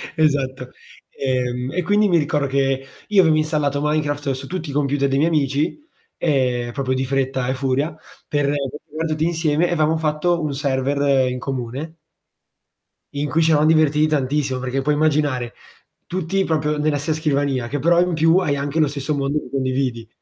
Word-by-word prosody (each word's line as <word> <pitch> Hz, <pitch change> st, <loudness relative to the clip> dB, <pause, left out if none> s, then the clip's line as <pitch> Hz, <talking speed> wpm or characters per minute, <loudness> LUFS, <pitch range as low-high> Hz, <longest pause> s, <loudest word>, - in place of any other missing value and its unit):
Esatto. 135 Hz, -5 st, 0 dB, 0.4 s
Ehm, 125 Hz, -1 st, -2 dB
e 180 Hz, -, 0 dB
quindi 205 Hz, +4 st, +3 dB
mi 175 Hz, -3 st, +3 dB
ricordo 150 Hz, -2 st, 0 dB
che, 135 Hz, 0 st, 0 dB, 0.2 s
io 205 Hz, -2 st, +5 dB
avevo 160 Hz, -3 st, +4 dB
installato 150 Hz, -2 st, 0 dB
Minecraft 145 Hz, -1 st, 0 dB
su 130 Hz, 0 st, -5 dB
tutti 175 Hz, -4 st, -5 dB
i -, -, -5 dB
computer 140 Hz, -1 st, +1 dB
dei 135 Hz, -, +1 dB
miei 155 Hz, +4 st, +3 dB
amici, 145 Hz, 0 st, 0 dB, 0.4 s
ehm, 125 Hz, -6 st, 0 dB
proprio 130 Hz, +1 st, -2 dB
di 130 Hz, +1 st, -1 dB
fretta 130 Hz, -1 st, -1 dB
e -, -, +1 dB
furia, 135 Hz, +4 st, -1 dB, 0.3 s
per 145 Hz, -1 st, 0 dB, 0.4 s
giocar 160 Hz, +2 st, -3 dB
tutti 155 Hz, 0 st, 0 dB
insieme 165 Hz, 0 st, +1 dB
e 175 Hz, -, 0 dB
avevamo 155 Hz, 0 st, +2 dB
fatto 160 Hz, +2 st, 0 dB
un 150 Hz, -2 st, -2 dB
server 140 Hz, -1 st, +1 dB
in 125 Hz, -, -3 dB
comune 135 Hz, +5 st, -5 dB, 1.2 s
in 145 Hz, +1 st, -1 dB
cui 160 Hz, +5 st, +2 dB
ci 160 Hz, -, +3 dB
eravam 155 Hz, 0 st, +4 dB
divertiti 155 Hz, -1 st, +4 dB
tantissimo, 140 Hz, -2 st, 0 dB
perché 130 Hz, +1 st, -2 dB
puoi 150 Hz, +2 st, +1 dB
immaginare 145 Hz, -5 st, +1 dB, 0.5 s
tutti 185 Hz, +2 st, -1 dB
proprio 150 Hz, -2 st, 0 dB
nella 150 Hz, 0 st, +1 dB
ste 145 Hz, +3 st, -1 dB
scrivania 140 Hz, -5 st, 0 dB
che 140 Hz, +4 st, -3 dB
però 170 Hz, +4 st, +3 dB
in 180 Hz, 0 st, +1 dB
più 165 Hz, +2 st, +4 dB
hai 155 Hz, -6 st, +1 dB
anche 140 Hz, +3 st, -2 dB
lo 155 Hz, -, +4 dB
stesso 140 Hz, +1 st, -3 dB
mondo 140 Hz, +2 st, 0 dB
che -, -, -11 dB
condividi. 130 Hz, -3 st, -1 dB
145 Hz, 180 wpm, -21 LUFS, 135-155 Hz, 1.2 s, io